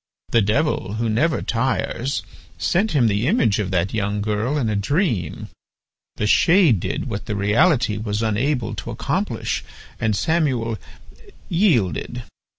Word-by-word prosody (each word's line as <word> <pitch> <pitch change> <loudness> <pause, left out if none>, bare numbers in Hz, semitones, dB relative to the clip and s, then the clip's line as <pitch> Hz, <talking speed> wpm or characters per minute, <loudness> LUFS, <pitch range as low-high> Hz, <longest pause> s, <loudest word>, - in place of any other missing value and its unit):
The 115 - +4
Devil, 105 +1 0
who 115 +1 -1
never 155 +10 +1
tires, 130 +2 -1 0.3
sent 200 +3 +1
him 135 -5 +3
the 105 +3 +1
image 110 -7 +2
of 100 -3 -1
that 90 0 0
young 105 -1 -1
girl 110 +7 -1
in 130 -6 0
a 105 - 0
dream. 110 - -1 0.7
The 105 - -2
shade 165 - +5
did - - -3
what 100 - -5
the 105 - -2
reality 115 - +2
was 105 0 -2
unable 115 +2 0
to - - -6
accomplish, - - -2 0.4
and 110 -2 +1
Samuel 130 - 0 0.7
yielded. 155 - +1
115 Hz, 140 wpm, -21 LUFS, 105-145 Hz, 0.7 s, shade